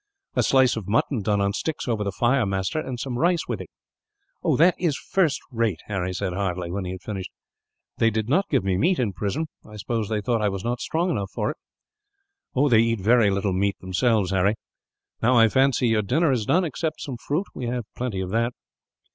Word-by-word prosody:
"A -, -, +3 dB
slice 130 Hz, -2 st, +4 dB
of 110 Hz, -5 st, -5 dB
mutton 115 Hz, +3 st, +1 dB
done 105 Hz, 0 st, +1 dB
on 100 Hz, 0 st, +1 dB
sticks 155 Hz, +7 st, -3 dB
over 110 Hz, -3 st, 0 dB
the 100 Hz, -, -2 dB
fire, 120 Hz, +5 st, +2 dB
master, 95 Hz, +7 st, -1 dB
and 130 Hz, -5 st, -5 dB
some 125 Hz, -2 st, -3 dB
rice 175 Hz, -1 st, +2 dB
with -, -, -3 dB
it." -, -, -9 dB, 0.9 s
"That 175 Hz, +3 st, +6 dB
is 165 Hz, -6 st, +1 dB
first 175 Hz, -7 st, +1 dB
rate!" 115 Hz, -8 st, 0 dB
Harry 95 Hz, -3 st, -2 dB
said 90 Hz, 0 st, -3 dB
heartily, 90 Hz, -2 st, -2 dB
when 95 Hz, +1 st, -3 dB
he 90 Hz, -, -4 dB
had 95 Hz, -, -9 dB
finished. 95 Hz, -3 st, -5 dB, 0.7 s
"They 115 Hz, -, +4 dB
did 110 Hz, 0 st, -2 dB
not 185 Hz, +10 st, +2 dB
give -, -, +2 dB
me 95 Hz, -2 st, +1 dB
meat, 175 Hz, +4 st, +3 dB
in 110 Hz, -6 st, 0 dB
prison. 105 Hz, -, -2 dB, 0.2 s
I 105 Hz, -, -13 dB
suppose 110 Hz, 0 st, -2 dB
they 110 Hz, -1 st, 0 dB
thought 115 Hz, +2 st, 0 dB
that 105 Hz, -, 0 dB
I -, -, +3 dB
was 95 Hz, -1 st, -4 dB
not 120 Hz, +1 st, -1 dB
strong 175 Hz, +3 st, 0 dB
enough 100 Hz, -, -2 dB
for -, -, -2 dB
it." -, -, -11 dB, 1.1 s
"They 110 Hz, -, +6 dB
eat 115 Hz, -1 st, +2 dB
very 110 Hz, +2 st, +4 dB
little 100 Hz, 0 st, 0 dB
meat 100 Hz, +2 st, 0 dB
themselves, 100 Hz, +1 st, +1 dB
Harry. 95 Hz, +3 st, +2 dB, 0.7 s
Now 125 Hz, +2 st, +4 dB
I 115 Hz, -1 st, +7 dB
fancy 130 Hz, 0 st, +3 dB
your 110 Hz, -1 st, +3 dB
dinner 140 Hz, -, +2 dB
is 115 Hz, -5 st, -1 dB
done, 180 Hz, +2 st, +3 dB
except 155 Hz, +1 st, -3 dB
some 130 Hz, -4 st, -5 dB
fruit. 150 Hz, +10 st, -2 dB
We 125 Hz, -, -5 dB
have 120 Hz, 0 st, -2 dB
got -, -, -39 dB
plenty 120 Hz, -7 st, -3 dB
of 95 Hz, 0 st, -4 dB
that." 115 Hz, +2 st, +1 dB
115 Hz, 220 wpm, -24 LUFS, 100-130 Hz, 1.1 s, I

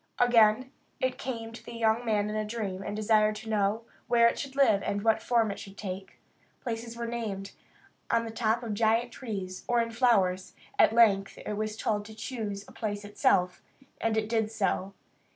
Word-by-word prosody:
Again 240 Hz, +1 st, +4 dB, 0.3 s
it 260 Hz, 0 st, -1 dB
came 230 Hz, -3 st, -5 dB
to 230 Hz, -, -10 dB
the 235 Hz, -, -9 dB
young 225 Hz, +1 st, +2 dB
man 210 Hz, -3 st, +1 dB
in 210 Hz, -, -3 dB
a 215 Hz, -, 0 dB
dream, 210 Hz, -4 st, -4 dB
and 205 Hz, -, -4 dB
desired 215 Hz, 0 st, +3 dB
to 220 Hz, +1 st, -8 dB
know 210 Hz, +2 st, +1 dB, 0.2 s
where 235 Hz, -1 st, +5 dB
it 235 Hz, -, 0 dB
should 275 Hz, -1 st, -6 dB
live 245 Hz, -8 st, +4 dB
and 200 Hz, 0 st, -2 dB
what 225 Hz, -1 st, +3 dB
form 230 Hz, -3 st, +2 dB
it 200 Hz, -, -7 dB
should 200 Hz, 0 st, -11 dB
take. 190 Hz, -1 st, -6 dB, 0.4 s
Places 230 Hz, -1 st, -5 dB
were 235 Hz, -, -3 dB
named 210 Hz, -4 st, -4 dB, 0.6 s
on 230 Hz, -, +2 dB
the 225 Hz, -, -5 dB
top 225 Hz, +1 st, 0 dB
of 225 Hz, -3 st, -3 dB
giant 225 Hz, +3 st, +2 dB
trees, 195 Hz, -8 st, -6 dB
or 240 Hz, -1 st, +3 dB
in 230 Hz, 0 st, 0 dB
flowers. 200 Hz, -7 st, +2 dB, 0.2 s
At -, -, +7 dB
length 205 Hz, -4 st, +4 dB
it -, -, -5 dB
was 215 Hz, +1 st, -3 dB
told 210 Hz, -2 st, -1 dB
to 220 Hz, +1 st, -11 dB
choose 210 Hz, -4 st, -5 dB
a -, -, -13 dB
place 205 Hz, -2 st, -4 dB
itself, 185 Hz, -3 st, +1 dB, 0.4 s
and 225 Hz, -1 st, 0 dB
it 215 Hz, -1 st, 0 dB
did 220 Hz, -1 st, 0 dB
so. 195 Hz, -3 st, -1 dB
220 Hz, 195 wpm, -29 LUFS, 205-230 Hz, 0.6 s, At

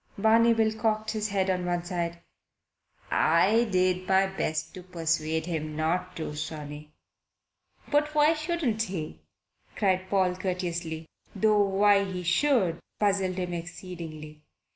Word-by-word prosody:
Barney 225 Hz, +3 st, +5 dB
Bill 220 Hz, -1 st, +2 dB
cocked 215 Hz, 0 st, -1 dB
his 215 Hz, -1 st, -2 dB
head 190 Hz, -1 st, +1 dB
on 180 Hz, -1 st, -1 dB
one 175 Hz, 0 st, -1 dB
side. 170 Hz, -1 st, -3 dB, 0.9 s
"I 205 Hz, +9 st, +4 dB
did 185 Hz, -2 st, +1 dB
my 190 Hz, 0 st, +4 dB
best 155 Hz, -5 st, -3 dB
to 185 Hz, -, -8 dB
persuade 160 Hz, -3 st, -1 dB
him 155 Hz, -3 st, -3 dB
not 180 Hz, +4 st, -1 dB
to, 155 Hz, -2 st, -5 dB
sonny." 150 Hz, 0 st, -7 dB, 1.0 s
"But 300 Hz, +1 st, +2 dB
why 300 Hz, +1 st, +5 dB
shouldn't 310 Hz, -8 st, -1 dB
he?" 165 Hz, -, -4 dB, 0.6 s
cried 185 Hz, -2 st, +1 dB
Paul 185 Hz, -2 st, +2 dB
courteously 175 Hz, -3 st, -3 dB, 0.3 s
though 210 Hz, +1 st, +3 dB
why 200 Hz, 0 st, +4 dB
he 185 Hz, -2 st, -4 dB
should 180 Hz, -, +2 dB, 0.2 s
puzzled 195 Hz, -3 st, +1 dB
him 180 Hz, -1 st, -3 dB
exceedingly. 165 Hz, -3 st, -8 dB
185 Hz, 130 wpm, -27 LUFS, 165-210 Hz, 1.0 s, Barney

